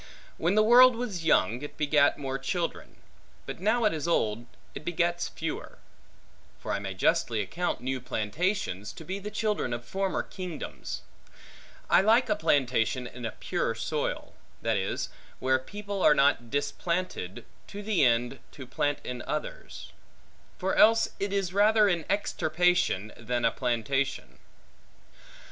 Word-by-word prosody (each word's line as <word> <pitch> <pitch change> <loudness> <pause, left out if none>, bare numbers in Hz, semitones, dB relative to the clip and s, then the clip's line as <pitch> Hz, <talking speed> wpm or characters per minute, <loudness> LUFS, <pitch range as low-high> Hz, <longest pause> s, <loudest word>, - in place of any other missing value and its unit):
When 175 +5 +1
the 215 - +5
world 245 +2 +8
was 210 -8 -4
young, 120 - +3
it 145 - -8
begat 145 -1 +3
more 135 -2 -3
children; 170 +5 -3 0.5
but - - -6
now 220 +5 +2
it 210 - +3
is 155 0 -3
old, 115 -7 0 0.3
it - - -7
begets 175 +1 0
fewer: 160 -1 -6 0.8
for - - -5
I 100 - 0
may 95 -1 -5
justly 110 +4 +1
account 170 - -2
new 130 0 -2
plantations, 110 - -2
to 160 - -11
be 190 +4 -4
the 205 +1 -6
children 210 - -1
of 120 0 -5
former 195 +7 -1
kingdoms. 180 -5 -6 0.8
I - - +5
like 225 +5 +4
a 210 - +3
plantation 130 - +1
in 125 0 -8
a - - -5
pure - - -2
soil; - - -3 0.3
that - - +1
is, - - -2 0.3
where 130 0 +2
people 200 +7 -6
are 150 - +6
not 140 -4 +3
displanted, 145 - -2 0.2
to 205 0 -8
the 205 -7 +2
end, 120 +1 +2
to 135 - -9
plant 145 +3 -1
in 125 -1 -5
others. - - -5 0.7
For 190 +1 -1
else 225 +1 +5
it 200 0 -2
is 195 -3 -1
rather 210 +1 +5
an 170 -5 0
extirpation, 180 - +1
than 120 -1 -1
a - - +4
plantation. 130 +2 -2
160 Hz, 150 wpm, -28 LUFS, 125-200 Hz, 0.8 s, world